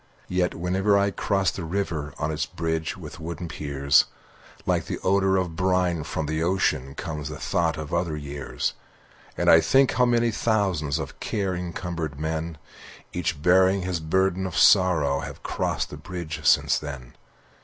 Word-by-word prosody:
Yet 90 -1 0
whenever 95 +4 +2
I 100 0 +2
cross 95 -1 +1
the 90 - -6
river 80 -5 -3
On 80 0 -1
its 75 -1 -2
bridge 80 +2 -2
with 85 -1 -9
wooden 85 +1 -5
piers, 70 -2 +2 0.6
Like - - +1
the - - -3
odor 95 0 +3
of 90 -3 -2
brine 90 -2 +1
from 80 0 -3
the 80 +1 -2
ocean 75 -7 0
Comes 75 -4 -5
the 75 - -6
thought 80 -1 0
of 75 -2 -6
other 85 -3 0
years. 70 -1 -3 0.6
And - - -1
I 80 - +8
think 135 +6 +4
how 125 - +3
many 120 -1 +2
thousands 95 -10 0
Of - - -6
care 95 -3 -1
encumbered 85 -4 -4
men, 80 +1 -3 0.6
Each 85 -3 -2
bearing 95 +3 +4
his 90 -2 -2
burden 95 +3 +1
of 90 - -5
sorrow, 80 -8 +5
Have - - -8
crossed - - -2
the - - -7
bridge 85 -3 -6
since - - +4
then. 70 -5 -8
85 Hz, 165 wpm, -25 LUFS, 75-95 Hz, 0.6 s, I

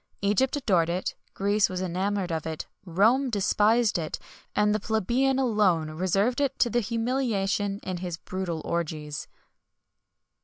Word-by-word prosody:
Egypt 210 +8 +2
adored 185 - +2
it, 180 +2 -2 0.2
Greece 200 +1 +2
was 185 -1 -3
enamoured 185 +1 -1
of 160 -1 -2
it, 160 -1 -4 0.2
Rome 225 +10 +3
despised 215 0 +2
it, 155 -2 -3 0.4
and 210 0 +3
the 215 - +1
plebeian 235 +6 +1
alone 205 -11 +2
reserved 195 - +1
it 275 -1 0
to 240 - +2
the 240 - +2
humiliation 220 -4 -1
in 185 -1 -3
his 175 -2 -4
brutal 180 -4 -4
orgies. 155 -4 -3
200 Hz, 140 wpm, -27 LUFS, 175-230 Hz, 0.4 s, Rome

